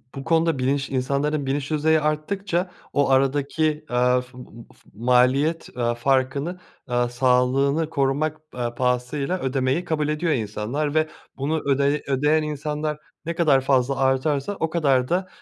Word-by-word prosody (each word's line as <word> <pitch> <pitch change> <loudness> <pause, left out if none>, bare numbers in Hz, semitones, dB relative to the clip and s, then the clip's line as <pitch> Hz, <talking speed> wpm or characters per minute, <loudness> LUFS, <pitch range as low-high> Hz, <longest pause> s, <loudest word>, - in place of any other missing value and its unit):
bu 135 - -6
konuda 165 -2 +2
bilinç 135 +2 0
insanların 140 +3 -1
bilinç 140 +2 -2
düzeyi 155 +1 +2
arttıkça 175 +4 -1 0.2
o 140 -1 +2
aradaki, 145 +3 +1
ııı, 125 +1 +3
f 125 0 -14 0.4
f - - -26
maliyet, 125 +7 +2
ııı, 120 -1 0
farkını, 135 +7 0 0.3
ııı, 120 0 +1
sağlığını 130 +5 +2
korumak, 145 +1 0 0.2
ııı, 120 -1 -3
pahasıyla 125 +7 -1
ödemeyi 130 +5 0
kabul 155 -3 -1
ediyor 155 +2 0
insanlar 125 +5 -2
ve 155 0 +2 0.3
bunu 150 +4 -1
ödeye 140 +2 +2
ödeyen 150 +3 +2
insanlar 150 0 -3 0.3
ne 170 - -2
kadar 155 -6 +3
fazla 135 0 +1
artarsa 135 +6 0
o 160 - 0
kadar 135 -6 +2
da, 185 +2 0
140 Hz, 140 wpm, -23 LUFS, 130-155 Hz, 0.4 s, ııı